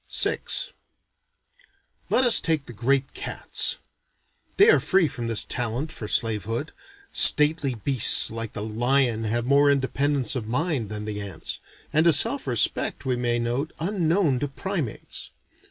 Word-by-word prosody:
VI - - +3 1.7
Let 260 - +2
us 240 - +6
take 160 -4 -2
the 120 - -11
great 135 +4 -1
cats. - - -3 0.8
They 410 +3 +6
are - - +4
free 190 -4 +1
from 120 -5 -6
this 115 -2 +2
talent 125 +6 -3
for 110 - -7
slave 110 -1 0
hood. 115 +8 -4 0.4
Stately 150 -3 +4
beasts 120 +1 +5
like 115 -1 -6
the 105 - -6
lion 120 +1 0
have 115 +2 -2
more 140 +2 +3
independence 140 -1 0
of 115 -4 -5
mind 125 - -2
than 105 -1 -6
the 105 -1 -5
ants, 95 -5 -7 0.3
and 155 +3 +2
a 170 - +5
self 140 -1 +3
respect, 125 +3 0
we 130 -1 -1
may 120 -1 -1
note, 120 +6 -3
unknown 165 -5 0
to 145 - -3
primates. 155 - -5
130 Hz, 150 wpm, -23 LUFS, 115-150 Hz, 1.7 s, us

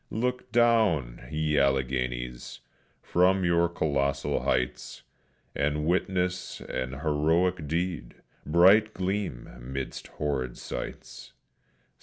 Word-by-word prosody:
Look 125 +2 -2
down, 105 - +2
ye 75 -1 +1
Alleghenies, 65 -2 -1 0.4
from 95 +1 +3
your 85 0 +3
colossal 70 -4 0
heights, 60 0 -2 0.5
And 75 +1 0
witness 90 +1 -1
an 65 0 -4
heroic 80 +2 +1
deed, 85 -5 -2 0.3
bright 95 +7 +5
gleam 95 -8 -2
'midst 65 +2 -6
horrid 65 -5 -2
sights. - - -7
75 Hz, 90 wpm, -28 LUFS, 65-90 Hz, 0.5 s, bright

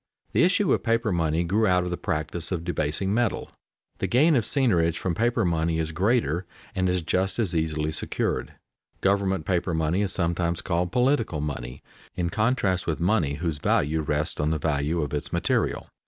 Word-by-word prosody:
The - - +2
issue - - +3
of - - +1
paper 115 -1 +1
money 80 -1 +1
grew 105 +6 +2
out 90 -1 +3
of 90 - -3
the - - 0
practice 80 +2 -3
of 85 -3 -2
debasing 90 +3 0
metal. 120 -1 0 0.5
The - - 0
gain 150 +6 +4
of 120 - +3
seigniorage 90 - +2
from 90 - -1
paper 115 +2 +1
money 80 -1 +1
is 80 -1 -1
greater 90 - +1 0.3
and 95 -1 0
is 90 -2 0
just 95 +3 0
as 105 -7 0
easily 80 -1 0
secured. - - -2 0.5
Government 95 -4 +1
paper 90 -2 0
money 80 +4 +1
is 100 -3 0
sometimes 85 -1 -1
called 90 0 -1
"political 125 - +1
money," 65 -4 -5 0.3
in 85 -1 -1
contrast 105 -4 +1
with 80 - -1
money 85 -5 +1
whose 80 -1 -3
value 75 +2 +1
rests 75 +1 -1
on 75 +1 +1
the 80 - +1
value 75 +2 0
of 75 - -5
its 75 - -3
material. - - 0
85 Hz, 185 wpm, -25 LUFS, 80-100 Hz, 0.5 s, gain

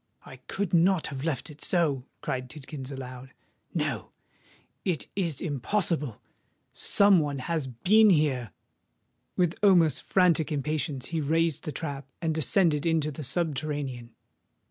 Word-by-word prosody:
"I 130 - -11
could 180 +8 -4
not 175 0 +4
have 135 0 -5
left 155 -1 -2
it 150 - -10
so!" 145 -8 +1
cried 130 -1 -3
Tidkins, 140 -1 -8
aloud: 130 -1 -8 0.4
"no—it 175 -5 -5
is 170 -8 -1
impossible! 150 - -1 0.5
Some 200 -2 +4
one 145 -2 -1
has 155 +1 -2
been 210 - +4
here!" 145 - +2 0.8
With 175 -1 +1
almost 180 -6 +5
frantic 175 -4 +2
impatience 145 -2 -2
he 165 -2 -1
raised 160 +1 +1
the 155 - -3
trap, 140 -1 -5
and 165 -2 0
descended 155 0 +2
into 160 -2 +1
the 150 +2 -7
subterranean. 140 -5 -2
150 Hz, 125 wpm, -28 LUFS, 135-170 Hz, 0.8 s, almost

